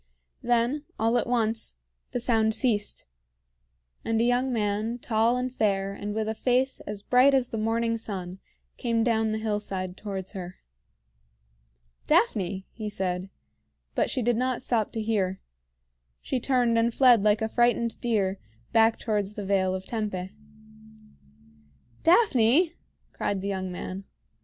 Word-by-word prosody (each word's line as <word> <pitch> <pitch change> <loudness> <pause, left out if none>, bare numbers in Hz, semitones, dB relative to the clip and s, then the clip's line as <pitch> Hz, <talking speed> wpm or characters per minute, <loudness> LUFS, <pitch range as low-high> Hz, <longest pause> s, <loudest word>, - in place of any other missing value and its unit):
Then, 245 +5 +1
all 225 +2 +1
at - - -3
once, 225 - 0 0.3
the - - -2
sound 220 -2 +2
ceased, 210 -5 0 1.0
and 225 0 0
a - - +3
young 245 +2 +2
man, 215 +1 -1
tall 230 +1 +1
and 250 0 -3
fair 195 -4 0
and 205 +1 -5
with 220 -1 -1
a 220 - -1
face 255 +3 +1
as 205 -1 -5
bright 260 +3 +5
as 255 -2 +1
the 225 - -3
morning 230 +1 0
sun, 190 -4 -5 0.4
came 230 -1 0
down 225 -2 +1
the 215 - -1
hillside 205 -4 -3
towards 195 -2 -5
her. 185 -3 -7 1.5
"Daphne!" 190 -1 +1
he 215 -2 -5
said; 185 -1 -3 0.6
but - - +1
she 255 - -1
did 240 0 +2
not 255 0 -1
stop 225 -5 0
to 225 - -2
hear. 195 -4 0 0.8
She 260 - -2
turned 245 -2 +2
and 230 +1 +2
fled 245 -3 +5
like 210 +1 +2
a - - +1
frightened 235 0 +1
deer, 200 -5 0 0.3
back 225 0 +4
towards 210 -2 -2
the 205 - -5
Vale 190 -1 +1
of 190 0 -6
Tempe. 205 -5 -3 1.7
"Daphne!" 330 - +4 0.4
cried 200 -2 -2
the 200 - -3
young 190 -1 -3
man. 185 +2 -6
220 Hz, 145 wpm, -27 LUFS, 200-240 Hz, 1.7 s, bright